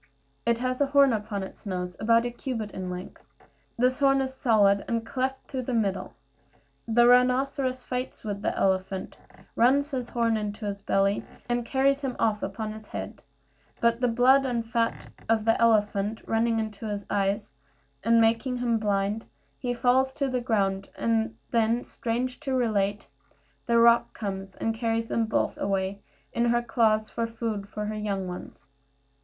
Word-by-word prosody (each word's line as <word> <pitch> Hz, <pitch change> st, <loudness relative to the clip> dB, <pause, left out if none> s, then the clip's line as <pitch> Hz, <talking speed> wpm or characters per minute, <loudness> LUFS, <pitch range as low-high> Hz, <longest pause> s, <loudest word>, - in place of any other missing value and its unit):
It 235 Hz, -1 st, +3 dB
has 255 Hz, +2 st, -2 dB
a 285 Hz, -, +4 dB
horn 280 Hz, -2 st, +5 dB
upon 210 Hz, -2 st, -3 dB
its 190 Hz, -, -10 dB
nose, 180 Hz, -3 st, -4 dB
about 230 Hz, +1 st, +3 dB
a 240 Hz, -, -2 dB
cubit 235 Hz, -4 st, -4 dB
in 185 Hz, -1 st, -5 dB
length; 180 Hz, 0 st, -7 dB, 0.6 s
this 255 Hz, +3 st, +2 dB
horn 275 Hz, -1 st, +4 dB
is 265 Hz, -1 st, -2 dB
solid, 205 Hz, -6 st, +3 dB
and 230 Hz, -1 st, -1 dB
cleft 265 Hz, +2 st, -2 dB
through 260 Hz, -2 st, -3 dB
the 255 Hz, 0 st, -2 dB
middle. 200 Hz, -4 st, -1 dB, 0.7 s
The 240 Hz, +1 st, +5 dB
rhinoceros 255 Hz, +1 st, +3 dB
fights 250 Hz, 0 st, -4 dB
with 205 Hz, -2 st, -4 dB
the -, -, -1 dB
elephant, 190 Hz, 0 st, 0 dB, 0.4 s
runs 280 Hz, +5 st, +3 dB
his 255 Hz, -3 st, -3 dB
horn 230 Hz, -2 st, +1 dB
into 210 Hz, 0 st, -4 dB
his 200 Hz, -1 st, -4 dB
belly, 195 Hz, 0 st, +1 dB, 0.2 s
and 240 Hz, 0 st, 0 dB
carries 275 Hz, +1 st, +2 dB
him 265 Hz, -3 st, -3 dB
off 215 Hz, -2 st, +1 dB
upon 215 Hz, +2 st, -4 dB
his 215 Hz, 0 st, -11 dB
head; -, -, -6 dB, 0.6 s
but 235 Hz, +1 st, +2 dB
the 250 Hz, -, +3 dB
blood 255 Hz, +3 st, +5 dB
and 240 Hz, -3 st, -1 dB
the 225 Hz, -, -19 dB
fat 230 Hz, -1 st, -1 dB, 0.2 s
of 220 Hz, -1 st, +2 dB
the 225 Hz, 0 st, +3 dB
elephant 210 Hz, -1 st, +2 dB
running 225 Hz, 0 st, +1 dB
into 220 Hz, 0 st, -4 dB
his 205 Hz, -1 st, -4 dB
eyes 200 Hz, -4 st, -1 dB, 0.5 s
and 230 Hz, +2 st, +4 dB
making 230 Hz, +3 st, +2 dB
him 235 Hz, -2 st, +1 dB
blind, 205 Hz, +1 st, 0 dB, 0.3 s
he 250 Hz, -2 st, -2 dB
falls 255 Hz, +2 st, +2 dB
to 275 Hz, -, -1 dB
the 255 Hz, -1 st, -1 dB
ground; 195 Hz, -5 st, 0 dB
and 225 Hz, 0 st, 0 dB, 0.2 s
then, 230 Hz, 0 st, +2 dB
strange 245 Hz, +2 st, -3 dB
to 275 Hz, -3 st, -2 dB
relate, 205 Hz, -4 st, 0 dB, 0.6 s
the 235 Hz, -1 st, +3 dB
roc 235 Hz, 0 st, +5 dB
comes 195 Hz, -2 st, -5 dB
and 225 Hz, -, -1 dB
carries 225 Hz, 0 st, -1 dB
them 230 Hz, -1 st, 0 dB
both 220 Hz, -, 0 dB
away 195 Hz, 0 st, -1 dB, 0.3 s
in 235 Hz, -, +1 dB
her 240 Hz, 0 st, +2 dB
claws 220 Hz, -2 st, +2 dB
for 230 Hz, +1 st, -2 dB
food 225 Hz, -3 st, -4 dB
for 210 Hz, 0 st, -4 dB
her 215 Hz, -, -3 dB
young 200 Hz, -3 st, -2 dB
ones. 180 Hz, -5 st, -9 dB
230 Hz, 170 wpm, -27 LUFS, 205-245 Hz, 0.7 s, horn